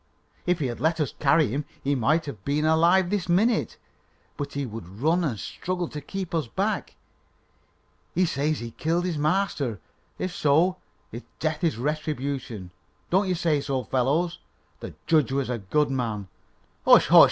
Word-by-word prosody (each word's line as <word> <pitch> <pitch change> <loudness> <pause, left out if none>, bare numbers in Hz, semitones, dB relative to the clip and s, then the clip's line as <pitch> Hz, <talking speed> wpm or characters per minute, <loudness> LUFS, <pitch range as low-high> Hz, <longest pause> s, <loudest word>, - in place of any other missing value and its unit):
"If 180 -1 +3
he 150 - -2
had 120 -2 -3
let 160 +4 +1
us 150 -5 -1
carry 150 -1 +4
him, 140 +6 -2 0.2
he 140 - +1
might 155 +6 +2
have 110 -10 -8
been 145 +4 0
alive 170 +4 +4
this 200 -4 -1
minute; 215 +6 +2 0.6
but 140 -1 -5
he 140 -1 -2
would 110 -6 -8
run 165 +6 +2
and 125 -10 -1
struggle 180 -1 -3
to 150 - -6
keep 185 +4 -5
us 160 -6 0
back. - - -2 1.2
He 185 +2 +4
says 150 -1 -1
he 120 0 -6
killed 170 +6 -1
his 170 -5 -2
master. 150 - 0 0.4
If 185 -1 -3
so, 165 +6 +3 0.3
his 120 - -6 0.2
death 155 0 -2
is 160 -9 +1
a - - -6
retribution. 135 - -3 0.4
Don't 190 +3 +3
you 185 - +1
say 160 -4 +1
so, 135 -2 -2
fellows? 140 +9 0 0.4
The - - -8
judge 155 -5 +3
was 135 -2 -1
a 120 - -2
good 140 +9 +1
man 110 -7 -2 0.3
" - - -38
"Hush! - - +7
hush! - - +9
150 Hz, 175 wpm, -26 LUFS, 130-170 Hz, 1.2 s, hush